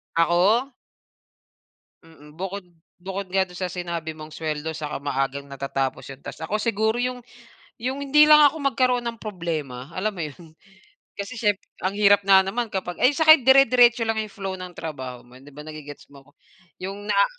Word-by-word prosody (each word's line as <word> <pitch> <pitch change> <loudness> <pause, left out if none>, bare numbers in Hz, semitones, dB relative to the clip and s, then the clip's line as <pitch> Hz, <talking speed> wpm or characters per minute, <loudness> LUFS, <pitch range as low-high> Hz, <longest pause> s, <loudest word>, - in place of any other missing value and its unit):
Ako? 185 +10 +3 1.3
Mm. 150 -2 -17
Bukod 190 +2 -5 0.4
bukod 190 +1 -5
nga 190 0 +3
'don 180 - -13
sa 185 -1 -3
sinabi 170 -3 -4
mong 155 0 -9
suweldo 155 0 -4
saka 150 -3 -5
maagang 140 0 -2
natatapos 135 -1 -3
yung 135 - -14
task, 160 - -7
ako 205 +6 -1
siguro 220 0 0
yung 250 0 -2 0.6
yung 265 +4 -3
hindi 300 +2 +5
lang 300 0 +8
ako 315 +3 -4
magkaroon 250 -2 +1
ng 230 -1 -5
problema, 160 - -5
alam 210 +4 -1
mo 175 - -5
yun? 155 +2 -10 0.7
Kasi 200 +5 -6
siyempre 205 -3 0 0.2
ang 190 +2 -1
hirap 205 -1 +5
nga 190 -1 +7
naman 230 +5 -2
kapag 185 -3 -4
ay 255 - +6
tsaka 315 0 +7
dire-diretso 250 -2 +5
lang 225 0 0
'yong 215 -2 -4
flow 195 -3 -5
ng 180 -1 -8
trabaho 130 -6 -7
mo, 125 +1 -19
'di 135 - -18
ba? 150 +2 -10
Nagge-gets 150 -2 -11
mo? 140 0 -18 0.5
'Yong 200 +2 -6
naa - - +4
190 Hz, 175 wpm, -24 LUFS, 155-225 Hz, 1.3 s, lang